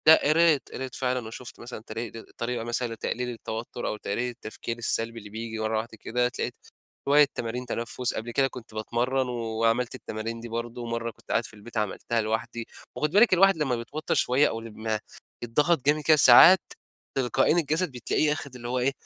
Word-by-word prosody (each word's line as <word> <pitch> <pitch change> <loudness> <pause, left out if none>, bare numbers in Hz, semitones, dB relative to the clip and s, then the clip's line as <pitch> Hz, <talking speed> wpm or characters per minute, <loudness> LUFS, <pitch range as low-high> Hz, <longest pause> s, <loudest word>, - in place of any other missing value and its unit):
لأ. 155 -2 +7
قريت، 160 -2 +4
قريت 130 -1 -5
فعلًا 125 -3 -1
.وشُفت 120 +2 -9
مثلًا 120 -2 -8
تري 115 +1 -4
د 115 - -9 0.2
طريقة 120 0 -2
مثلًا 120 0 -2
لتقليل 125 +2 -3
التوتر، 115 0 -5
أو 105 - -2
تقليل 120 +4 -2
التفكير 115 0 -6
السلبي 115 0 -1
اللي 105 -1 -11
بييجي 110 +1 -5
مرة 110 0 0
واحدة 110 +1 -5
كده. 125 +1 +1
اتلاقيت 125 - -5 0.4
شوية 145 +1 +7
تمارين 120 +2 -3
تنفُس، 120 +1 -1
قبل 115 +2 -4
كده 135 +2 +3
كنت 125 -4 -11
باتمرّن، 120 +4 -1
وعملت 115 0 0
التمارين 115 +2 -5
دي 115 - -7
برضه، 120 +1 -5
مرّة 115 0 -3
كنت - - -12
قاعد 115 - +1
في - - -11
البيت 110 +3 -10
عملتها 110 +2 -1
لوحدي. 115 +2 -3 0.3
وخُدي 150 +1 -1
بالِك، 210 +1 +6
الواحد 195 0 +5
لمّا 140 -5 0
بيتوتر 145 +7 -3
شوية، 130 +4 +3
أو 115 - -4
لمّا 110 -1 -3 0.4
يتضغط 145 +5 +1
جامد 150 +2 +3
كده، 155 +1 +5
ساعات، 150 +8 +9 0.6
تلقائيًا 135 +5 +2
الجسد 160 +1 +1
بتلاقيه 130 +4 +1
آخد 140 -3 -7
اللي 120 -1 -7
هو 125 +1 -1
إيه، 130 +3 +2
120 Hz, 185 wpm, -27 LUFS, 115-135 Hz, 0.6 s, ساعات